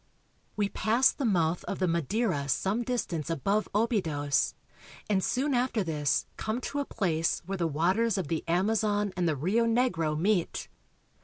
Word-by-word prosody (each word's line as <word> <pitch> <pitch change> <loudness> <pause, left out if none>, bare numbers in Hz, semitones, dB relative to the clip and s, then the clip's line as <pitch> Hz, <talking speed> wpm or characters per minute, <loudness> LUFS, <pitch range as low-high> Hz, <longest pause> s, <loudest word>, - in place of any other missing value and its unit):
We 205 -1 +1
pass 235 +6 +3
the 280 - -4
mouth 175 -5 +1
of - - -3
the 185 - +1
Madeira 170 - 0
some 195 - +1
distance 200 - -2
above 195 +7 0
Obidos, 165 - +1 0.5
and 195 -3 +1
soon 275 +3 0
after 245 -3 +1
this 150 -4 0
come 220 +3 -2
to 285 - -3
a 285 - -1
place 165 -9 -1
where 195 +1 -4
the 170 - +1
waters 185 +9 +1
of 185 -6 -2
the 160 +1 -2
Amazon 205 +3 +1
and 180 -2 0
the 155 - 0
Rio 195 - +1
Negro 185 -11 +1
meet. 185 +1 0
195 Hz, 160 wpm, -29 LUFS, 165-225 Hz, 0.5 s, pass